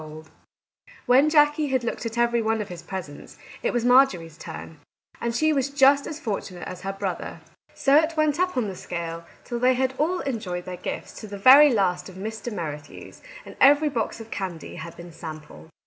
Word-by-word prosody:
Our 155 - -9
Little 155 +1 -10
Canadian 160 - -27
Cousin - - -70
91 - - -22 0.2
When 300 +2 +4
Jackie 295 0 +3
had 260 -2 0
looked 235 - -4
at 230 +1 -7
every 235 0 +2
one 225 0 0
of 210 - -4
his 175 -2 -8
presents, 170 -5 -8 0.2
it - - 0
was 240 -1 -1
Marjorie's 245 - +4
turn, 160 -1 -9 0.4
and 235 0 -2
she 310 +4 +2
was 275 -1 0
just 280 0 +4
as 300 - -6
fortunate 195 -6 -5
as 185 -1 -8
her 195 +1 -3
brother. 195 -3 -5 0.3
So 275 +1 +4
it 320 +1 +1
went 305 0 +2
on 365 - +3
up 365 - -12
the 210 -7 -1
scale, 170 -2 -6 0.2
till 240 -1 -4
they 255 +1 +3
had 260 +1 0
all 350 +5 +1
enjoyed 195 -10 -4
their 180 -1 -6
gifts - - -6
to 215 - -8
the 200 0 -7
very 270 +7 +8
last 180 -4 0
of 185 - -13
Mr. 220 +5 -6
Merrithew's, 150 -7 -7 0.2
and - - -11
every 290 +3 +6
box 230 -4 -3
of 225 0 -11
candy 180 -5 -5
had 165 +1 -8
been 175 0 -10
sampled. 155 - -10
225 Hz, 215 wpm, -24 LUFS, 175-275 Hz, 0.4 s, very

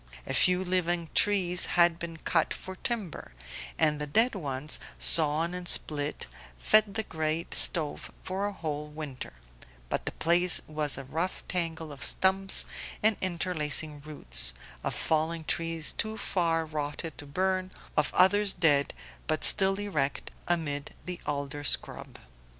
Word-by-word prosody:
A - - -3
few 180 0 +4
living 175 -2 -1
trees 185 -3 +2
had 170 -1 +5
been 165 -1 -6
cut 165 0 0
for 190 - -8
timber, 200 - -4 0.4
and 150 -1 +2
the 150 - -3
dead 225 - +4
ones, 145 -5 -2 0.2
sawn 160 +2 +2
and 180 -1 -6
split, 145 -3 0 0.3
fed 210 - +4
the 220 - 0
great 160 -2 -3
stove 155 -4 +2
for 195 +2 -2
a - - -3
whole 150 -5 -5
winter; 150 - -8 0.6
but - - -3
the - - +1
place 175 +2 +3
was 150 -2 -2
a 135 - -6
rough 160 +8 -3
tangle 165 -3 -2
of 140 - -9
stumps 190 +1 +1 0.4
and 220 0 +5
interlacing 160 -4 0
roots, - - -4 0.3
of - - -2
fallen 160 +1 0
trees 165 0 0
too 220 0 -4
far 165 -5 0
rotted 155 0 -5
to 145 - -8
burn, 185 +4 -1 0.3
of 150 - +1
others 200 +2 +4
dead 145 -5 +2 0.3
but 155 -1 -1
still 195 -1 +7
erect 155 -10 -2 0.2
amid 150 -4 -2
the 180 -1 -5
alder 145 0 -3
scrub. 145 - -1
165 Hz, 145 wpm, -28 LUFS, 150-185 Hz, 0.6 s, still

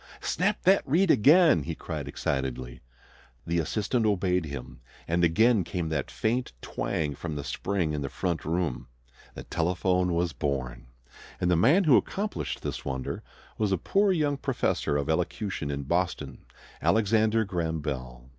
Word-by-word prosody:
"Snap 200 +4 0
that 190 +2 +5
reed 165 +6 +3
again!" 155 - +6
he 80 +3 -4
cried - - -5
excitedly. 65 -2 -3 0.6
The 85 0 0
assistant 110 - 0
obeyed 90 -4 +1
him, 65 -4 -8 0.3
and 85 +1 +1
again 110 +5 +4
came 85 -1 -3
that 75 -3 -2
faint 120 - -1
twang 75 +4 -2
from 80 +2 -5
the 70 - -4
spring 85 +2 -1
in 75 - -2
the 70 - -3
front 85 -4 -2
room. 80 -7 -2 0.5
The - - -7
telephone 90 +1 0
was 85 -1 0
born! 65 -5 -3 0.5
And 90 - +1
the - - +4
man 145 - +5
who 150 -7 +6
accomplished 210 +2 -3
this - - -4
wonder 65 -2 -4 0.4
was 105 -2 +1
a 95 - +2
poor 200 - +2
young 150 -5 +1
professor 130 - 0
of 70 -1 -2
elocution 90 0 -2
in 70 0 -3
Boston, 65 0 -2 0.4
Alexander 110 +1 +3
Graham 85 -4 -2
Bell. 65 -4 -5
85 Hz, 155 wpm, -27 LUFS, 70-110 Hz, 0.6 s, again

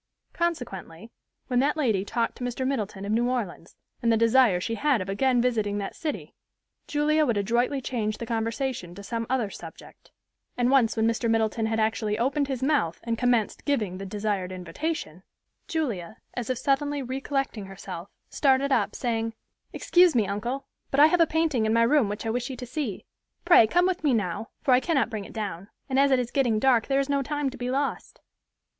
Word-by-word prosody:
Consequently, 230 - -4 0.3
when 250 -1 +1
that 290 +4 +1
lady 225 -10 +1
talked 230 +3 -1
to - - -8
Mr. 245 +1 -2
Middleton 210 -7 -2
of 205 - -3
New 240 +3 +2
Orleans, 210 -9 -4 0.3
and 230 - +2
the 225 - +4
desire 230 -4 +4
she 230 - -3
had 280 +1 +2
of 185 0 -5
again 250 +5 +2
visiting 215 -5 0
that 200 -1 -4
city, 305 -3 -5 0.5
Julia 305 +1 +2
would 235 -7 +1
adroitly 240 +6 +1
change 220 -5 -2
the 235 - -5
conversation 230 -4 -3
to 200 - -9
some 230 +2 -3
other 245 -6 0
subject; - - -12 0.5
and 245 +1 +2
once 240 -5 +3
when 220 - +2
Mr. 230 0 0
Middleton 225 0 +1
had 225 0 -1
actually 215 -1 0
opened 275 +4 +1
his 265 -2 -3
mouth 270 - +1
and 230 0 -1
commenced 240 -2 +1
giving 210 -11 -1
the 195 - -5
desired 200 -2 -2
invitation, 180 - -4 0.5
Julia, 220 - -3 0.2
as 245 -2 -4
if 255 - 0
suddenly 280 +2 0
recollecting 265 -4 -3
herself, 190 -1 -8 0.2
started 275 0 +2
up, 210 -5 +1
saying, 225 -2 -2 0.4
"Excuse 355 -4 +4
me, 225 -4 +3
uncle, 235 +7 -3 0.2
but 275 - 0
I 295 - +9
have 340 +2 +3
a 330 - +5
painting 305 -9 +1
in 220 - +2
my 230 0 +4
room 240 -2 +3
which 205 +2 -5
I 225 - 0
wish 245 +3 -2
you 265 - -5
to 250 0 -7
see. 250 -5 -4 0.4
Pray, 345 -11 +7
come 355 +9 +3
with 365 -3 -1
me 280 -5 +3
now, 205 +1 -2
for 270 - +2
I 250 - +6
cannot 275 -4 0
bring 210 -3 -4
it - - -12
down, 200 -3 -5 0.2
and 265 0 +1
as 280 0 +5
it 265 - +4
is 245 -1 -2
getting 245 -6 +2
dark, 240 -1 +3
there 275 0 +2
is 275 - 0
no 280 -1 +1
time 290 0 -2
to 260 - -10
be 245 0 -2
lost." 275 +2 -2
240 Hz, 200 wpm, -26 LUFS, 215-275 Hz, 0.5 s, I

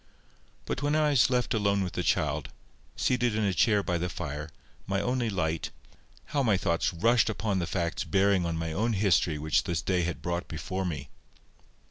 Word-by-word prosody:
But - - -3
when 145 +1 +1
I 155 -1 +3
was 135 -3 +4
left 125 0 +1
alone 100 -2 +1
with 90 - -4
the - - -1
child, - - 0 0.5
seated 120 -3 +1
in 110 - 0
a 100 -2 +1
chair 105 +4 +3
by 90 -2 -1
the 90 +1 -2
fire, 75 -2 -5 0.4
my 95 0 0
only 125 +1 0
light, 80 -5 -1 0.6
how 145 - +2
my 110 -7 +3
thoughts 85 -2 0
rushed 115 +8 +3
upon 105 -3 -1
the 85 - -2
facts 85 -2 -2
bearing 100 -1 +2
on 85 -1 -2
my 80 -1 -3
own 115 +6 0
history 95 -5 +2
which 75 +1 +1
this 85 -4 -2
day 90 -2 +1
had 85 0 -3
brought 85 0 -2
before 95 +4 -4
me! 75 -6 -4
95 Hz, 190 wpm, -28 LUFS, 85-110 Hz, 0.6 s, was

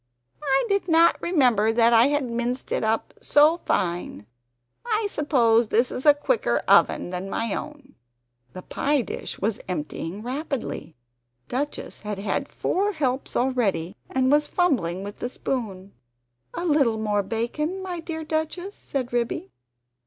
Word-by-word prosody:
I 270 -2 +2
did 400 -3 0
not 335 0 +4
remember 250 - +3
that 230 +1 +4
I 230 +2 +6
had 290 0 +1
minced 240 +2 -3
it - - 0
up 220 +1 0
so 305 +4 +4
fine; 170 - -1 0.6
I 440 -3 0
suppose 240 -6 +3
this 235 +4 +2
is 260 - -3
a 295 - +8
quicker 450 +11 +1
oven 175 - +4
than 185 +2 -4
my 225 -1 -1
own." 295 -3 -7 0.6
The 185 - -8
pie 285 0 0
dish - - -6
was 210 +1 -1
emptying 170 +3 -4
rapidly! 260 - -4 0.5
Duchess 285 +4 -4
had 210 -1 -4
had 200 +2 -2
four 405 +3 0
helps 265 -5 -2
already, 210 -9 0
and 260 0 +1
was 295 0 +4
fumbling 195 - 0
with 205 +1 -8
the 245 - -3
spoon. 200 -8 -4 0.6
"A 345 - -3
little 280 -9 +3
more 210 -1 0
bacon, 245 - -3
my 360 -2 -4
dear 320 -1 -5
Duchess?" 315 +5 -3
said 255 -3 -4
Ribby. 235 - -2
255 Hz, 145 wpm, -24 LUFS, 215-300 Hz, 0.6 s, a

